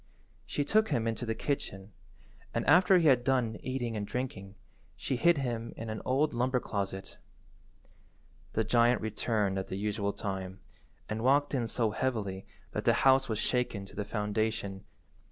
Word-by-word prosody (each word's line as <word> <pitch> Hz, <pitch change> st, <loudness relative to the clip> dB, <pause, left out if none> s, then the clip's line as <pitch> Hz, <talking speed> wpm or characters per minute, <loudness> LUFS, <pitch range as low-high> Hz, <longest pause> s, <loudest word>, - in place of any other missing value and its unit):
She 145 Hz, -, -1 dB
took 215 Hz, +7 st, +3 dB
him 115 Hz, -2 st, 0 dB
into 115 Hz, +1 st, -2 dB
the 115 Hz, -, -1 dB
kitchen, 100 Hz, -9 st, -3 dB, 0.6 s
and -, -, 0 dB
after 180 Hz, +4 st, +6 dB
he 165 Hz, -3 st, +3 dB
had 125 Hz, -4 st, +5 dB
done 125 Hz, -4 st, +1 dB
eating 125 Hz, -3 st, -3 dB
and 105 Hz, -, -2 dB
drinking, 100 Hz, -6 st, -4 dB, 0.4 s
she 130 Hz, -, -2 dB
hid 170 Hz, +6 st, +4 dB
him 120 Hz, -4 st, -3 dB
in 115 Hz, -1 st, -5 dB
an 110 Hz, -, -5 dB
old 145 Hz, +4 st, +2 dB
lumber 125 Hz, +2 st, +1 dB
closet. 100 Hz, -4 st, -4 dB, 1.3 s
The 110 Hz, -, +1 dB
giant 120 Hz, +2 st, +4 dB
returned 105 Hz, -2 st, -1 dB
at 95 Hz, -, -5 dB
the 95 Hz, -, -4 dB
usual 100 Hz, 0 st, -1 dB
time, 95 Hz, -1 st, -5 dB, 0.5 s
and 110 Hz, +1 st, -3 dB
walked 145 Hz, +3 st, +3 dB
in 120 Hz, -4 st, 0 dB
so 115 Hz, -1 st, 0 dB
heavily 100 Hz, -6 st, -2 dB, 0.2 s
that -, -, -3 dB
the -, -, +5 dB
house 135 Hz, -1 st, +5 dB
was 110 Hz, -, -1 dB
shaken 115 Hz, -4 st, -1 dB
to -, -, -14 dB
the 105 Hz, -, -2 dB
foundation. 105 Hz, -1 st, -2 dB
115 Hz, 165 wpm, -31 LUFS, 100-130 Hz, 1.3 s, after